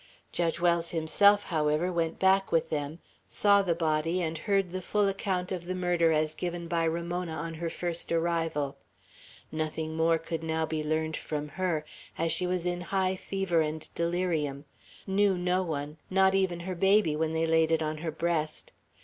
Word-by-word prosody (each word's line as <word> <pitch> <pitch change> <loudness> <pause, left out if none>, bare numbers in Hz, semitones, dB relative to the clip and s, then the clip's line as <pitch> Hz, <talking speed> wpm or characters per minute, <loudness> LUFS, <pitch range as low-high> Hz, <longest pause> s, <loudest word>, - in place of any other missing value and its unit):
Judge 170 -1 0
Wells 170 -1 +2
himself, 200 +6 +4
however, 155 +1 0
went 165 -1 -1
back 190 0 +3
with 165 - +1
them, 150 +1 -2 0.3
saw 200 -1 +4
the 175 -4 0
body, 165 +1 0
and 165 -2 -1
heard 195 +2 0
the 185 +1 -4
full 205 +3 +1
account 190 -2 -2
of 180 -2 -3
the 185 +1 -3
murder 175 -2 +2
as 155 0 +1
given 175 0 -4
by 165 -1 +1
Ramona 170 +1 -2
on 165 +1 -4
her 165 +1 -3
first 170 0 -3
arrival. 165 -4 0 0.7
Nothing 155 0 -3
more 165 0 +3
could 165 0 -5
now 160 0 -1
be 155 -1 -2
learned 155 +1 -1
from 150 -1 -4
her, 170 -2 -1 0.3
as 165 0 0
she 180 +2 0
was 180 -1 -1
in 175 0 -1
high 190 +1 0
fever 190 -3 0
and 155 0 -3
delirium; 170 -5 -1 0.4
knew 195 -1 +2
no 180 +1 +1
one, 150 -3 -4
not 190 0 +4
even 190 -3 +1
her 185 +2 -4
baby 195 -3 +3
when 160 +1 -1
they 160 0 +1
laid 160 0 +3
it 160 -1 +2
on 155 0 -3
her 165 +1 -3
breast. 160 -1 -2
170 Hz, 180 wpm, -29 LUFS, 160-180 Hz, 0.7 s, himself